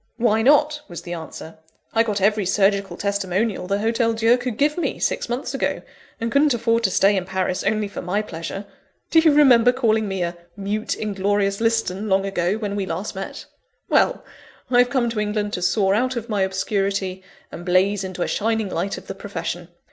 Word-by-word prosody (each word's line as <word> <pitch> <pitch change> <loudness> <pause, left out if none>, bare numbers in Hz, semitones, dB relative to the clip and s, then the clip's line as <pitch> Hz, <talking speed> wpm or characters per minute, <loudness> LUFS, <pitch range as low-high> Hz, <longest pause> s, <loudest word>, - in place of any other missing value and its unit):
"Why 225 -2 +2
not?" 295 +4 +4
was 175 -3 -8
the 175 -1 -6
answer. 160 -1 -8 0.3
"I 225 - +4
got 210 -3 -1
every 210 +1 +3
surgical 195 +1 +1
testimonial 200 0 -1
the 200 +1 +1
Hotel 230 +2 +1
Dieu 225 +2 +4
could 245 -2 -4
give 295 +1 +2
me, 345 - -2
six - - -1
months 245 +3 -3
ago; - - -1 0.4
and 230 0 -2
couldn't 280 -1 +4
afford 230 0 +1
to - - +3
stay 195 +2 +3
in 190 - 0
Paris 190 -1 -2
only 215 -1 0
for 200 - -7
my 200 +4 -1
pleasure. 170 +2 -6 0.5
Do 325 - +6
you 320 -1 +5
remember 250 -5 +6
calling 220 -4 +1
me 195 -2 -2
a 170 0 -3 0.2
'mute, 205 +2 -2
inglorious 200 0 0
Liston,' 220 -3 0
long 195 0 +2
ago, 185 -1 0
when 205 -2 -3
we 195 -2 -2
last 185 +5 -4
met? 195 0 -7 0.4
Well, - - +2 0.5
I 245 - +5
have 245 0 +5
come 245 -2 +1
to 225 - -3
England 210 0 -1
to 180 - -2
soar 190 +2 +2
out 255 +5 +1
of 235 0 -5
my 205 -3 0
obscurity 190 0 -1 0.3
and 170 - -8
blaze 190 +2 +2
into 185 -2 -3
a - - -2
shining 220 -1 0
light 185 +3 -2
of - - -10
the - - -6
profession. 175 -3 -5
205 Hz, 200 wpm, -22 LUFS, 190-230 Hz, 0.5 s, Do